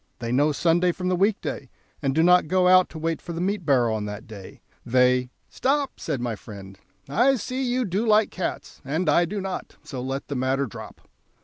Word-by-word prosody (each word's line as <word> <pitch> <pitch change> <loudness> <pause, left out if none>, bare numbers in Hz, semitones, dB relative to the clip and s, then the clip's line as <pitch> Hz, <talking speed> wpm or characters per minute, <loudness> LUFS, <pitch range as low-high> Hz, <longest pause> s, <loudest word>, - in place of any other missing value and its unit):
They 115 -1 -4
know 145 +4 +3
Sunday 175 +4 +2
from 180 +1 -3
the 185 - +2
week 200 +3 +2
day, - - -5 0.3
and 135 -2 0
do 160 - +4
not 180 -1 +5
go 185 +2 +3
out 185 0 +6
to - - -10
wait 165 +1 -2
for 170 - -7
the 165 - -5
meat 185 -2 -2
barrow 125 -5 +3
on 105 -1 -2
that 105 +1 -7
day; 100 -4 -12 0.2
they 125 +1 +2
" - - -45
"Stop," 280 +1 -1
said 145 -5 -3
my 120 -2 -2
friend, 100 -2 -11 0.3
"I 245 - +3
see 255 +2 -4
you 250 -1 0
do 195 +3 -1
like 215 0 +4
cats, 185 - -5
and 155 +6 -2
I 170 +4 +4
do 200 +5 -4
not, 190 -1 -5
so 130 -3 -6
let 135 +2 -4
the 145 - -4
matter 130 +2 0
drop." 110 - -11
160 Hz, 220 wpm, -24 LUFS, 125-185 Hz, 0.3 s, out